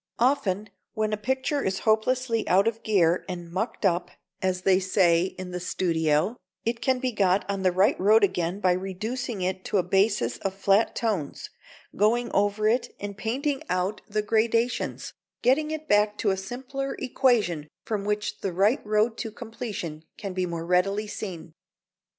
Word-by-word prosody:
Often 215 -6 +1 0.2
when 215 0 0
a 210 +2 -5
picture 265 +2 0
is 190 -4 -1
hopelessly 230 +1 +1
out 195 +4 +4
of 225 0 -1
gear 180 -5 +2
and 175 -2 -6
"mucked 220 +4 -2
up," 175 -2 +1 0.3
as 185 -1 -1
they 190 -1 +4
say 180 -2 +3
in 185 -1 -6
the 180 - -3
studio, 165 +1 +1 0.3
it 230 0 -1
can 260 -1 +2
be 255 0 -1
got 195 -3 +2
on 200 -1 -2
the 185 -1 +3
right 190 +3 +3
road 210 +3 +5
again 185 -1 0
by 185 -3 +3
reducing 195 +5 -3
it 185 +1 -2
to - - 0
a 185 - +3
basis 180 - +1
of 195 -1 -3
flat 195 +3 +2
tones, 205 -11 -2 0.4
going 235 +4 +2
over 205 +2 +2
it 235 +3 0
and 205 0 -5
painting 270 +7 -2
out 185 +3 -1
the 210 0 0
gradations, 230 +3 0 0.3
getting 275 +5 +3
it 310 0 -5
back 210 0 +3
to 205 - +1
a - - +1
simpler 260 +7 -5
equation 225 - +1 0.2
from 215 -3 -2
which 210 0 -2
the 195 - -2
right 205 - +2
road 215 +2 +1
to 225 - -3
completion 210 -8 -6
can 200 -3 -5
be 185 -1 -1
more 165 -1 -4
readily 195 +4 +2
seen. 175 -6 -7
205 Hz, 170 wpm, -26 LUFS, 185-230 Hz, 0.4 s, road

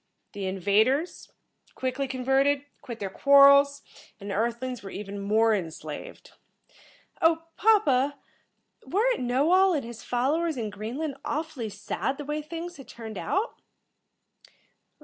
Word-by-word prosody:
The 200 -2 -4
invaders, 215 - +1 0.4
quickly 260 +1 -2
converted, 270 +2 +1 0.2
quit 240 -5 -8
their 195 -2 -4
quarrels, 280 +2 +6 0.4
and 200 0 -6
the - - -2
Earth 230 +3 0
lings 255 -2 -5
were 195 - -8
even 200 0 -6
more 220 +3 +3
enslaved." 190 - -6 0.9
"Oh, 325 -1 +3
papa, 290 - +3 0.7
weren't 465 +6 +1
Knowall 325 +10 +3
and 275 -6 -2
his 235 -1 -9
followers 295 +6 0
in 220 -3 -3
Greenland 260 +9 -5
awfully 305 -7 -3
sad 210 +6 -3
the 290 - -7
way 300 +1 -2
things 335 +3 -7
had 270 - -12
turned 220 -4 -8
out?" 390 - -2
265 Hz, 130 wpm, -27 LUFS, 220-305 Hz, 0.9 s, quarrels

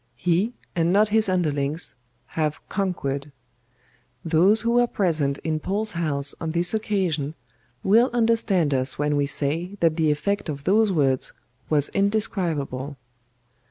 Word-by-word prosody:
He, 180 - +1 0.2
and 170 0 +2
not 210 +2 +4
his 220 -1 +3
underlings, 155 -3 -1 0.4
have 155 -2 -1
conquered. 145 -8 -2 0.9
Those 180 +7 +4
who 235 - 0
were 240 0 +4
present 155 -10 0
in 155 -1 -1
Paul's 210 +6 -1
House 145 -4 0
on 165 - -2
this 170 +3 -1
occasion 180 -9 -1 0.5
will 230 +6 +4
understand 225 -9 +2
us 130 0 0
when 150 0 0
we 145 -1 +1
say 160 +7 -2
that 165 -1 +2
the 160 -2 +2
effect 160 +6 -1
of 140 -2 -5
those 210 +4 +3
words 135 -6 +1 0.4
was 145 -2 +2
indescribable. 165 -10 -1
165 Hz, 135 wpm, -24 LUFS, 145-200 Hz, 0.9 s, not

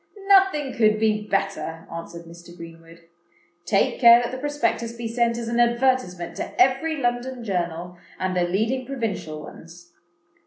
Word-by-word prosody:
"Nothing 385 -8 +4
could 215 -2 +2
be 215 -1 0
better," 195 -5 -2
answered 170 0 -8
Mr. 170 +1 -14
Greenwood. 165 0 -13 0.6
"Take 195 - +1
care 235 -1 +9
that 240 - -3
the 255 - -6
Prospectus 290 -5 -1
be 235 0 -5
sent 235 0 0
as 235 -1 -5
an 235 +1 -1
advertisement 235 -7 +1
to - - -6
every 270 +6 +2
London 245 -1 -2
journal, 175 -3 -4 0.2
and 185 0 -2
the 180 - +1
leading 220 +9 0
provincial 220 - -4
ones. 175 +1 -14
220 Hz, 150 wpm, -23 LUFS, 175-250 Hz, 0.6 s, care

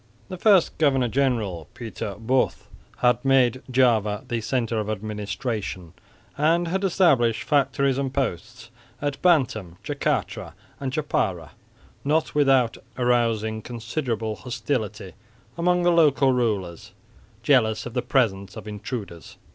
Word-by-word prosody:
The 185 - -6
first 195 -2 +3
governor 135 -5 +3
general, 110 - -1
Pieter 110 -4 -6
Both, 125 +4 0 0.3
had 125 -1 +3
made 130 -2 +3
Java 115 -4 +2
the 120 -3 -2
centre 115 -1 -1
of 105 0 -3
administration 105 -3 -4 0.4
and 165 +4 +2
had 190 +3 -1
established 135 - +3
factories 140 -1 +1
and 135 -1 -2
posts 120 -2 -4 0.3
at 145 -1 -3
Bantam, 120 - +2
Jacatra 140 -10 -2 0.3
and 135 -2 -3
Djapara, 95 - -1 0.5
not 155 +3 +1
without 135 -5 +3 0.2
arousing 115 -3 +1
considerable 115 -1 -3
hostility 110 -6 -4 0.4
among 180 +1 +1
the 175 - +4
local 145 -5 +4
rulers, 100 -9 -2 0.5
jealous 110 -6 +3
of 120 - -7
the 125 - 0
presence 100 -9 0
of - - -7
the 105 - -7
intruders. 105 -5 -7
125 Hz, 125 wpm, -24 LUFS, 110-140 Hz, 0.5 s, the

